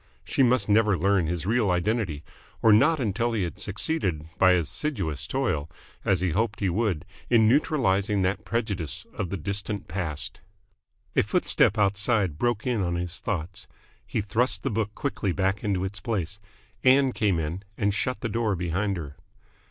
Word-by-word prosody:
She - - 0
must 125 -1 +3
never 105 -2 +4
learn 95 0 +2
his 85 0 -3
real 110 0 +2
identity 90 -4 0 0.4
or 110 - +7
not 155 +9 +5
until 115 0 0
he 105 -4 0
had 85 - -5
succeeded 100 - -2
by 95 -1 +6
assiduous 90 - -2
toil, 80 - -1 0.3
as 95 -3 +2
he 90 -2 +1
hoped 105 +4 0
he 95 -3 +1
would, 95 -5 0 0.2
in 115 -3 +5
neutralising 105 -7 +2
that 95 +3 0
prejudice 100 - -3
of 95 - -3
the 100 - -3
distant 100 +1 -3
past. 85 -4 -4 0.7
A - - +5
footstep 105 - +2
outside 100 - +1
broke 120 -3 0
in 120 -5 +1
on 85 -2 0
his 90 +1 -4
thoughts. 90 -3 -4 0.4
He 105 - -2
thrust 110 +5 0
the - - -1
book 105 -1 -2
quickly 105 -9 -2
back 95 +2 0
into 95 -3 0
its 95 +1 -4
place. 100 -2 -3 0.4
Ann 130 +1 +5
came 105 -5 +1
in, 80 +3 -3 0.2
and 100 -1 +1
shut 125 +6 -2
the 115 - -1
door 110 -2 0
behind 90 +3 -1
her. 75 -4 -7
100 Hz, 165 wpm, -26 LUFS, 90-115 Hz, 0.7 s, or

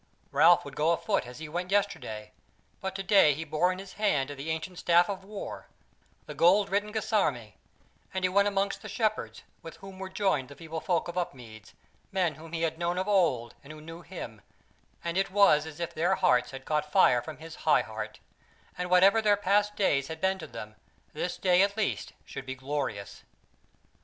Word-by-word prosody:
Ralph - - +5
would 140 -1 -9
go 150 +2 +2
afoot 195 - -1
as 125 - -10
he 160 0 -7
went 175 +4 -4
yesterday; 195 - -1 0.5
but 190 0 -4
today 195 -6 +4
he 160 - -4
bore 160 +3 +1
in 185 - -4
his 195 0 -9
hand 145 -10 +1
the 145 +2 -6
ancient 160 +3 -4
staff 175 0 +4
of 190 -1 -6
war, 200 +1 -7 0.6
the - - -7
gold 195 +4 +4
written 205 +1 0
guisarme; 155 - 0 0.6
and 190 0 -1
he - - +2
went 200 +2 +3
amongst 200 0 -1
the 215 - -8
Shepherds, 215 0 -2 0.2
with 165 - -9
whom 195 -1 -12
were 190 0 -5
joined 190 -9 0
the 140 - -11
feeble 160 0 -6
folk 175 -3 0
of 175 +1 -2
Upmeads, 120 -10 -7 0.4
men 180 -4 +1
whom 160 +3 -12
he 165 0 -2
had 160 0 -1
known 175 +1 -1
of 190 +2 -1
old 165 - +2
and 140 - -11
who 155 - -10
knew 165 +2 -10
him, 155 - -8 0.6
and 170 +2 -1
it 195 - 0
was 180 -6 +4
as 160 +1 -10
if 170 - -3
their 165 +3 +2
hearts 125 0 +3
had 135 -1 -9
caught 150 -1 -1
fire 125 -4 +5
from 155 0 -8
his 160 +1 -10
high 155 - +3
heart, 110 -1 -6 0.6
and 180 - -1
that - - -11
whatever 195 +5 +6
their 205 -2 +4
past 205 +1 +2
days 140 -10 +1
had 160 0 -6
been 190 +1 +1
to 160 - -7
them, 105 -5 -9 0.4
this 175 +4 -3
day 180 -1 +4
at 200 +1 +1
least 215 - -2
should 135 - -8
be 130 - -4
glorious. 130 -7 -4
170 Hz, 200 wpm, -29 LUFS, 150-195 Hz, 0.6 s, whatever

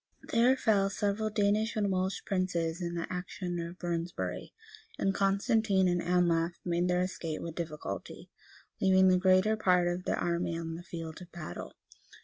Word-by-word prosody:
[*] - - -38
There 245 +3 +5
fell 200 -5 +3
several 205 +1 -1
Danish 210 +1 +1
and 205 -2 +1
Welsh 185 +1 -1
princes 180 -3 -1
in 170 0 -3
the 170 - -2
action 180 0 -4
of 170 +1 -6
Brunsbury;[] 170 -1 -3 0.5
and 195 - +1
Constantine 195 0 +2
and 175 -1 +1
Anlaf 170 -1 +2
made 175 0 +1
their 180 0 +2
escape 170 -4 -3
with 170 - -5
difficulty, 155 - -6 0.5
leaving 190 0 +5
the 185 0 +4
greater 185 +3 +4
part 180 -4 +3
of 175 +1 -2
their - - 0
army 170 -1 -1
on 165 -1 -4
the 165 - -6
field 165 -1 -7
of 175 -1 -12
battle. 155 - -7
180 Hz, 165 wpm, -31 LUFS, 170-195 Hz, 0.5 s, There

